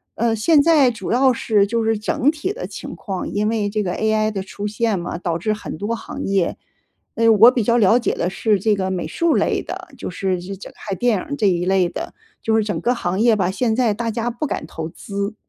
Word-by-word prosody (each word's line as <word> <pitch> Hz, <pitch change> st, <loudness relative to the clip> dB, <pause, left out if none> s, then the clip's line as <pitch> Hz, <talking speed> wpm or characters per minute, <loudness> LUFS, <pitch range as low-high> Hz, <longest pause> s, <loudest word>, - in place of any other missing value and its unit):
呃， 230 Hz, 0 st, +1 dB
现 290 Hz, +7 st, +4 dB
在 295 Hz, -6 st, +5 dB
主 230 Hz, -, -5 dB
要 260 Hz, +2 st, +4 dB
是 215 Hz, -3 st, +2 dB
就 230 Hz, +1 st, 0 dB
是 225 Hz, -1 st, +1 dB
整 235 Hz, +6 st, +1 dB
体 325 Hz, +6 st, -3 dB
的 -, -, -6 dB
情 -, -, -8 dB
况， 190 Hz, -3 st, -5 dB
因 210 Hz, +1 st, 0 dB
为 215 Hz, -3 st, 0 dB
这 210 Hz, +1 st, -1 dB
个 180 Hz, -2 st, -2 dB
AI 220 Hz, 0 st, +1 dB
的 195 Hz, -2 st, -4 dB
出 200 Hz, +1 st, -7 dB
现 215 Hz, -1 st, 0 dB
嘛， 170 Hz, 0 st, -4 dB
导 170 Hz, -2 st, -2 dB
致 215 Hz, +6 st, -1 dB
很 210 Hz, -, -7 dB
多 205 Hz, +6 st, -2 dB
行 -, -, -7 dB
业， 195 Hz, -3 st, 0 dB, 0.6 s
呃， 230 Hz, 0 st, +2 dB
我 225 Hz, +3 st, +8 dB
比 245 Hz, -3 st, 0 dB
较 235 Hz, +3 st, +3 dB
了 220 Hz, +1 st, +5 dB
解 -, -, 0 dB
的 175 Hz, -, -1 dB
是 210 Hz, +1 st, +1 dB
这 210 Hz, +2 st, +2 dB
个 190 Hz, -1 st, -2 dB
美 180 Hz, -2 st, -2 dB
术 335 Hz, -2 st, +1 dB
类 -, -, +1 dB
的， -, -, -7 dB
就 -, -, -5 dB
是， 185 Hz, +1 st, -1 dB
呃 -, -, -4 dB
这 190 Hz, +3 st, -7 dB
这 195 Hz, -, -11 dB
拍 200 Hz, -2 st, -5 dB
电 235 Hz, +1 st, +1 dB
影 -, -, -3 dB
儿 285 Hz, -, -5 dB
这 210 Hz, -7 st, +2 dB
一 175 Hz, -1 st, 0 dB
类 185 Hz, -1 st, +2 dB
的， -, -, -6 dB, 0.3 s
就 220 Hz, 0 st, +1 dB
是 220 Hz, -, +3 dB
整 205 Hz, 0 st, -2 dB
个 245 Hz, -, +1 dB
行 185 Hz, -4 st, -2 dB
业 230 Hz, 0 st, +4 dB
吧， 185 Hz, -2 st, 0 dB
现 225 Hz, +2 st, 0 dB
在 235 Hz, -3 st, +2 dB
大 230 Hz, +2 st, -3 dB
家 235 Hz, +1 st, -2 dB
不 240 Hz, +6 st, -3 dB
敢 -, -, -3 dB
投 160 Hz, 0 st, -6 dB
资。 200 Hz, +4 st, -5 dB
215 Hz, 275 characters per minute, -20 LUFS, 195-235 Hz, 0.6 s, 我